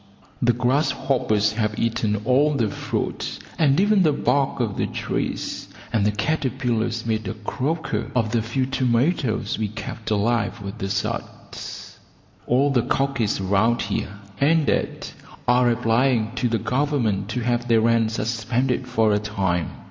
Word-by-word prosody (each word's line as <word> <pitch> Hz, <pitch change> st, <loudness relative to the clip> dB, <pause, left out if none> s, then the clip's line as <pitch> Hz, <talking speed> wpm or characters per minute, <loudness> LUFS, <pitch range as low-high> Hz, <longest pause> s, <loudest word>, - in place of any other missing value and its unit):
The 120 Hz, 0 st, +4 dB
grasshoppers 125 Hz, -4 st, +1 dB
have 110 Hz, -1 st, -1 dB
eaten 110 Hz, -2 st, 0 dB
all 145 Hz, +4 st, +3 dB
the 115 Hz, -6 st, +1 dB
fruit -, -, -3 dB, 0.2 s
and 145 Hz, -1 st, +4 dB
even 205 Hz, 0 st, +4 dB
the 160 Hz, -4 st, +4 dB
bark 135 Hz, 0 st, +1 dB
off 115 Hz, -5 st, -1 dB
the -, -, -1 dB
trees, -, -, -3 dB, 0.3 s
and 110 Hz, -3 st, +2 dB
the -, -, +2 dB
caterpillars 120 Hz, -2 st, -1 dB
made 110 Hz, -2 st, -1 dB
a 95 Hz, -, -3 dB
croker 140 Hz, +9 st, -2 dB
of 115 Hz, -3 st, +1 dB
the 115 Hz, -1 st, +2 dB
few 120 Hz, +4 st, -1 dB
tomatoes 130 Hz, -1 st, 0 dB
we 110 Hz, -, 0 dB
kept 110 Hz, +1 st, -7 dB
alive 110 Hz, +2 st, +1 dB
with 100 Hz, -1 st, -7 dB
the 95 Hz, -, -3 dB
suds. 100 Hz, 0 st, -5 dB, 0.5 s
All 135 Hz, +4 st, +3 dB
the 125 Hz, -3 st, +3 dB
cockeys 130 Hz, -4 st, 0 dB
round 100 Hz, +5 st, +2 dB
here 100 Hz, -1 st, -3 dB, 0.3 s
and 155 Hz, +2 st, +3 dB
dad -, -, -1 dB, 0.4 s
are 125 Hz, 0 st, +4 dB
applying 115 Hz, 0 st, +2 dB
to 125 Hz, -1 st, 0 dB
the 115 Hz, -, +1 dB
Government 115 Hz, -4 st, 0 dB
to 120 Hz, +2 st, -2 dB
have 120 Hz, 0 st, 0 dB
their 115 Hz, -2 st, +4 dB
rents 115 Hz, -1 st, +2 dB
suspended 120 Hz, +3 st, -1 dB
for 110 Hz, -4 st, +2 dB
a 105 Hz, -, +2 dB
time. 95 Hz, -6 st, -1 dB
120 Hz, 150 wpm, -23 LUFS, 110-130 Hz, 0.5 s, The